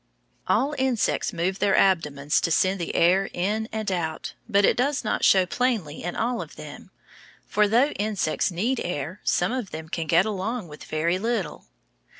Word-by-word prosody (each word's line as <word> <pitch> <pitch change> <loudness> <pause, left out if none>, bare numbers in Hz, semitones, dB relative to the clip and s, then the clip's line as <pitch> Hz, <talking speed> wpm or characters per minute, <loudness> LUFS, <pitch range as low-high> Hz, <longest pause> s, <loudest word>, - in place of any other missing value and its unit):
All 285 +2 +2
insects 260 -4 0
move 185 +4 -2
their 200 -1 +3
abdomens 150 -6 +2
to - - 0
send 190 +3 +2
the 170 - -4
air 190 +3 +3
in 210 +5 -1
and 220 -2 -2
out, 160 -3 -3 0.2
but 200 -2 +4
it - - +3
does 270 +3 0
not 215 - -1
show 190 -1 +5
plainly 210 - -1
in 175 - -4
all 240 +2 -1
of - - -10
them, - - -10 0.6
for, 210 0 +2
though 240 +7 +3
insects 205 - -1
need 225 +9 -1
air, 175 +1 -4
some 180 +4 +1
of 250 -6 -3
them 160 0 -8
can 165 -1 -3
get 170 +4 +4
along 215 0 -3
with 150 -1 -11
very 170 +4 0
little. 225 -2 -3
190 Hz, 175 wpm, -25 LUFS, 170-220 Hz, 0.6 s, show